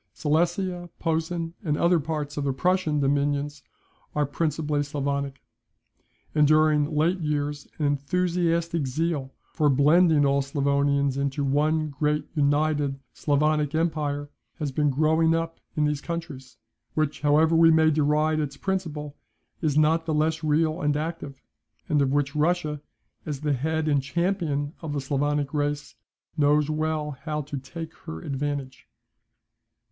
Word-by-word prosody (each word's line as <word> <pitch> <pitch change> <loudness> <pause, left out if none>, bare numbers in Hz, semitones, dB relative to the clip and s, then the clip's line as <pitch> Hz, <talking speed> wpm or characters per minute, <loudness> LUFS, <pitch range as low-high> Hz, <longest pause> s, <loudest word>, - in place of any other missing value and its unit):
Silesia, 175 +3 0
Posen, 165 +1 -2
and 150 -4 0
other 170 0 +3
parts 150 -1 -4
of 145 - -2
the 140 -1 0
Prussian 175 0 +1
dominions 145 +1 0 0.5
are 150 -1 +2
principally 150 0 -1
Sclavonic. 140 -1 -3 0.9
And 150 -1 +4
during 155 0 +3
late 170 +5 +2
years 145 -2 -2
an 150 - -1
enthusiastic 170 +2 0
zeal 145 -1 -2 0.2
for 150 -1 +2
blending 150 +2 +4
all 140 0 +3
Sclavonians 140 0 +1
into 140 +1 -1
one 150 +2 +1
great 150 +1 -1
united 145 -2 +1
Sclavonic 150 0 +1
empire, 150 -3 -1 0.2
has 150 -5 -3
been 150 +2 +1
growing 160 +3 +3
up 165 0 -3 0.2
in 150 - +3
these 150 -1 -1
countries, 145 -8 -6 0.4
which, 155 -1 -1
however 155 +2 +4
we 165 0 +7
may 160 -1 +5
deride 155 +1 +2
its 140 -2 -3
principle, 155 -7 -3 0.5
is 150 -3 +1
not 160 +2 +3
the 155 - 0
less 155 +1 0
real 155 +2 +1
and 150 0 +1
active, 155 -3 -5 0.4
and 150 -1 +2
of 135 -1 +1
which 145 0 0
Russia, 150 -1 0 0.5
as 145 -2 -4
the 150 -1 +1
head 160 +4 -1
and 145 -2 +3
champion 155 -1 -1
of 160 -3 -4
the 145 - -1
Sclavonic 145 +1 -1
race, 145 0 -2 0.4
knows 150 0 +3
well 155 -1 -1
how 150 +2 -4
to 145 -1 -5
take 160 +5 -8
her 80 - -5
advantage. 140 -1 -4
150 Hz, 140 wpm, -25 LUFS, 145-160 Hz, 0.9 s, we